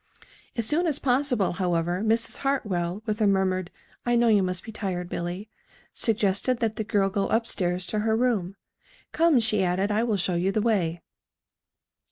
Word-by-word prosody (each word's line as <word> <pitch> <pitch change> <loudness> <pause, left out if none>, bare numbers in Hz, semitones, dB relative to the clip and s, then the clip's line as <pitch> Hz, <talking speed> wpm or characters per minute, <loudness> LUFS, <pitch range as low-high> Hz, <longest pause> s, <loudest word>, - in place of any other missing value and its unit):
As 230 - +1
soon 325 +8 +2
as 295 -4 +1
possible, 250 -6 +1
however, 175 0 -1
Mrs. 225 +1 +1
Hartwell, 205 -9 -2
with 215 0 -2
a 210 - +4
murmured 185 -2 +1 0.3
"I 240 0 +1
know 235 0 +4
you 210 -2 +4
must 185 -1 -2
be 225 - -8
tired, 185 -5 -4
Billy," 175 +5 -4 0.5
suggested 220 +2 +1
that 225 -2 -1
the 220 - -1
girl 200 -2 +1
go 200 0 0
up 225 +1 +1
stairs 180 -4 0
to 215 - -2
her 220 +1 +1
room. 215 -7 0 0.6
"Come," 325 -5 +3
she 215 -3 +2
added, 185 +3 0
"I 210 +2 +1
will 225 -4 0
show 180 0 0
you 175 +3 +1
the 215 - 0
way." 185 -7 0
205 Hz, 180 wpm, -26 LUFS, 185-230 Hz, 0.6 s, a